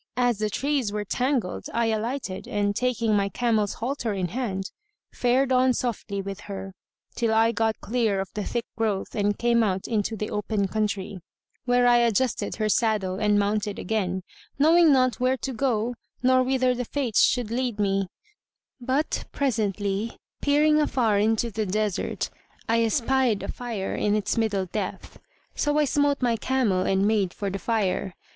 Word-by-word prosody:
As 245 -4 +2
the 215 0 0
trees 270 -1 -1
were 210 0 -3
tangled 250 -3 -1
I 235 0 +2
alighted 220 -2 -3
and, 205 -1 0
taking 235 -3 +1
my 200 -1 +1
camel's 220 -3 0
halter 240 -2 -2
in 185 -2 -2
hand, 195 -3 -3 0.4
fared 255 +2 +2
on 255 0 +4
softly 210 -5 -3
with 195 0 -6
her, 195 -1 -6 0.4
till 230 -2 0
I 225 +1 +4
got 225 -1 0
clear 225 -4 0
of 195 0 -3
the 210 - -3
thick 235 +2 -3
growth 215 -4 -1
and 205 -1 0
came 235 0 +3
out 190 -4 0
into 220 -1 -1
the 210 - -4
open 210 -1 -1
country, 200 -2 -2 0.5
where 245 0 +3
I 240 0 +6
adjusted 235 +1 +1
her 215 -1 0
saddle 210 -4 +1
and 210 -1 +3
mounted 205 0 0
again, 190 -3 -2 0.3
knowing 320 +2 +6
not 255 -2 +3
where 255 +1 +2
to 265 +1 -4
go 240 -2 0 0.3
nor 255 0 +5
whither 255 0 +2
the 250 0 -3
Fates 255 -4 +1
should 240 -3 +1
lead 240 -3 -1
me; 195 -1 +1 0.7
but, 260 +5 -1
presently, 210 -4 -1 0.2
peering 300 +1 +4
afar 230 -8 +2
into 225 +2 +1
the 215 0 -2
desert, 210 0 -1 0.4
I 230 0 +3
espied 245 -1 +1
a - - -4
fire 230 -6 -4
in 205 0 +1
its 210 -2 0
middle 210 -4 0
depth. 190 +1 -5 0.3
So 295 0 0
I 300 - +4
smote 285 -1 +1
my 235 -2 +2
camel 235 -8 +1
and 195 +1 +2
made 205 -4 +1
for 200 -2 -3
the 195 - -4
fire. 195 -3 -1
220 Hz, 165 wpm, -25 LUFS, 205-250 Hz, 0.7 s, I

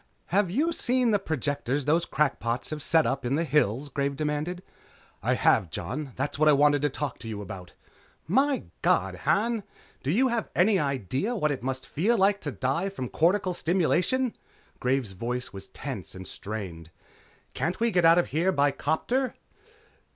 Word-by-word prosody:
"Have 200 -1 +3
you 295 - +1
seen 250 -4 +1
the 205 - +3
projectors 145 -5 -2
those 165 +3 +2
crackpots 135 -4 -1
have 155 -1 -4
set 160 +1 +3
up 135 0 -1
in 125 +3 0
the 165 - +1
hills?" 145 -4 +1
Graves 140 0 -1
demanded. 155 +5 -2 0.6
"I - - +1
have, 90 - +3
Jon. 135 - -5
That's 140 +2 -3
what 155 0 +5
I - - +7
wanted 145 0 +4
to 145 - +2
talk 140 -1 -4
to - - -9
you 110 -2 -4
about." 95 -3 -8 0.5
"My 270 - +2 0.2
God, - - +2 0.2
Han! 225 +2 +2 0.4
Do 135 - -3
you 250 - +3
have 235 -2 -1
any 195 +2 +4
idea 140 - -1
of - - -3
what 150 - +3
it 140 - -3
must 130 +1 -3
feel 220 +10 +1
like 200 +1 +3
to 145 - -3
die 135 - -1
from 130 -11 -5
cortical 185 +3 +2
stimulation?" 185 +9 +1 0.4
Graves' 125 -4 0
voice 120 +6 -4
was 95 0 -8
tense - - -7
and 95 0 -8
strained. 95 -7 -6 0.6
"Can't 175 +5 -2
we 230 0 +2
get 180 -3 +2
out 165 +1 +7
of 175 - +2
here 170 +5 +2
by 145 -5 +3
'copter?" 240 - -1
150 Hz, 180 wpm, -27 LUFS, 130-190 Hz, 0.6 s, I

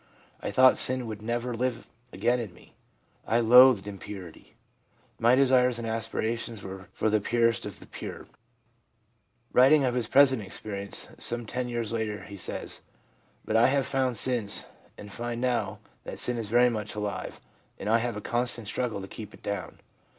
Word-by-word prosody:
I - - -3
thought 130 0 +6
sin 130 -1 +4
would 110 -2 -6
never 120 +2 -2
live 125 0 -2 0.2
again 120 +1 +1
in 105 -7 -6
me. - - -19 0.5
I 115 - +3
loathed 120 -2 +7
impurity; 95 -3 -9 0.6
my 120 +2 +5
desires 125 -2 +4
and 115 -1 -5
aspirations 115 0 -3
were 95 0 -8
for - - -1
the 110 -1 +2
purest 115 +2 +1
of - - -9
the - - -12
pure/ - - -8 1.3
Writing 135 +4 +6
of 125 -2 +1
his 120 -2 -1
present 135 -3 +5
experience, 100 0 -6
some 120 0 -2
ten 125 +3 -3
years 115 -2 -3
later, 105 -3 -3
he 100 - -10
says: 95 - -6 0.3
* - - -36
But 110 - -2
I 115 +2 +6
have 135 0 +1
found 130 -3 0
since 115 -3 +1 0.3
and 105 - -10
find 120 +2 -4
now 120 -5 -1 0.3
that - - -7
sin 120 -1 +1
is 110 -3 -5
very 120 +2 +4
much 105 -2 -4
alive, 105 -1 -4 0.4
and 100 - -6
I 115 +2 +4
have 120 -2 -3
a - - -5
constant 120 -1 -1
struggle 115 -2 -2
to 95 - -7
keep 105 +1 -9
it - - -22
down. 100 -2 -5
115 Hz, 175 wpm, -28 LUFS, 105-125 Hz, 1.3 s, loathed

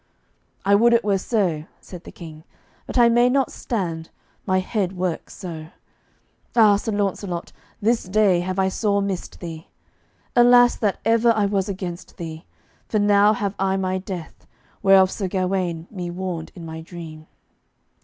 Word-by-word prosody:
"I 200 - +4
would 235 +4 +5
it 235 - +3
were 200 -2 +1
so," 185 -8 -1
said 180 -2 -11
the - - -9
King, 160 -3 -11 0.4
"but - - -4
I 240 -1 +7
may 240 +1 +4
not 270 0 +1
stand, 170 -8 -4 0.4
my 185 -1 +2
head 190 0 -1
works 180 -2 -3
so. 165 -5 -7 0.9
Ah, 215 -3 +6
Sir 220 +2 -3
Launcelot, 195 -3 -2 0.3
this 230 +2 +2
day 190 -1 +3
have 185 +1 -3
I 190 0 +2
sore 200 +1 0
missed 195 -3 -4
thee. 165 -2 -7 0.7
Alas, 245 0 +6
that 205 -3 0
ever 230 +1 +4
I 215 -2 +1
was 200 -1 0
against 185 -2 -6
thee, 160 -1 -7 0.4
for 215 - 0
now 205 0 +4
have 200 -2 -2
I 190 0 +1
my 185 0 -1
death, 185 -4 -8 0.3
whereof 190 -1 +5
Sir 195 - -3
Gawaine 185 -3 -1
me 180 -4 -5
warned 175 -2 -5
in 170 -3 -9
my 160 0 -7
dream." 160 -2 -10
190 Hz, 160 wpm, -22 LUFS, 175-210 Hz, 0.9 s, I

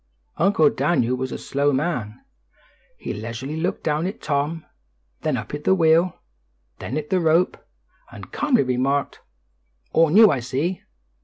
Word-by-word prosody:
Uncle 195 -6 +3
Daniel 130 -4 +1
was 130 0 -4
a - - -4
slow 140 +1 0
man. 130 -7 -2 0.8
He - - -5
leisurely 115 +7 -6
looked 175 +3 -2
down 155 +3 0
at 195 - -6
Tom, 150 +2 -2 0.6
then - - 0
up - - -7
at 145 0 -5
the 190 - +3
wheel, 165 +1 +3 0.6
then 135 - -4
at 150 -1 -5
the 185 - +3
rope, 165 +2 +2 0.6
and - - -11
calmly 285 -5 +2
remarked, 130 +2 -1 0.7
"All 165 -1 +4
new, 210 +5 +7
I 140 - 0
see." 140 +9 -2
150 Hz, 150 wpm, -22 LUFS, 135-170 Hz, 0.8 s, new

